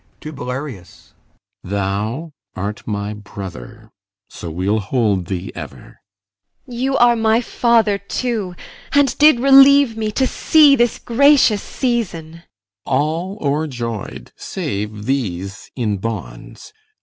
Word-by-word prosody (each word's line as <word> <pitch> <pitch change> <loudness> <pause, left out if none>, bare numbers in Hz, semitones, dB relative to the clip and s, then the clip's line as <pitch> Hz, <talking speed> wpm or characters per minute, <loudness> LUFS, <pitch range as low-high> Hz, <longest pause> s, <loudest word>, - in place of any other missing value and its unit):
[To 155 - -7
BELARIUS] 125 -7 -8 0.5
Thou 100 - -3 0.2
art 100 +3 -5
my 105 -1 -3
brother; 95 - -10 0.4
so 85 - -7
we'll 95 +6 -1
hold 100 -4 0
thee 90 -2 -4
ever. - - -10 0.7
IMOGEN. 245 -3 -8
You 270 +1 +1
are 240 0 +5
my 225 0 +2
father 230 -4 +2
too, 200 -2 -3 0.4
and 285 -2 +3
did 300 -4 +6
relieve 275 -1 +6
me 215 -1 -2
To 265 - +1
see 295 +1 +5
this 240 -2 +1
gracious 255 -4 +4
season. 225 - -3
CYMBELINE. 165 +1 -15 0.4
All 160 +8 -1
o'erjoy'd 125 - -3
Save 105 +1 -5
these 100 -7 -3
in 110 -5 -1
bonds. 95 - -7
145 Hz, 115 wpm, -19 LUFS, -, 0.7 s, did